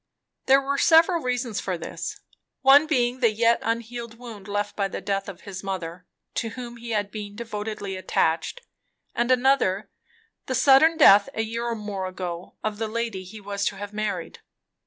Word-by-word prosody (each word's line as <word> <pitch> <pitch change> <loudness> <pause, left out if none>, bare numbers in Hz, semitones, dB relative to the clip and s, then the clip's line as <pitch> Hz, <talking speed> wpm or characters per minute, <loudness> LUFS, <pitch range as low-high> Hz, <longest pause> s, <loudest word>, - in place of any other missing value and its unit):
There 270 +1 +6
were 280 +1 -1
several 330 +1 +5
reasons 245 -4 -2
for 185 -2 -3
this; 165 - -6 0.4
one 280 +3 +7
being 250 -4 +1
the 235 -3 +4
yet 230 +2 +3
unhealed 230 0 -4
wound 225 -5 -10
left 205 0 -2
by 200 -1 0
the - - -5
death 195 0 -2
of 185 -2 -10
his 190 -1 -8
mother, 180 -2 -5 0.3
to 230 - -2
whom 240 0 -8
he 235 0 -9
had 205 -2 -1
been 205 -2 -7
devotedly 210 -3 -5
attached, 170 - 0 0.5
and 240 +1 0
another 250 -6 +2 0.6
the 260 - -1
sudden 295 +6 +6
death 200 -9 +7
a 220 - 0
year 230 +2 -3
or 235 - -1
more 205 -3 -4
ago 180 -1 -6
of 215 -1 -3
the 225 - -1
lady 225 -3 -3
he 205 +4 -10
was 200 0 -4
to - - 0
have 205 +1 -7
married. 215 0 -3
220 Hz, 180 wpm, -25 LUFS, 200-245 Hz, 0.6 s, one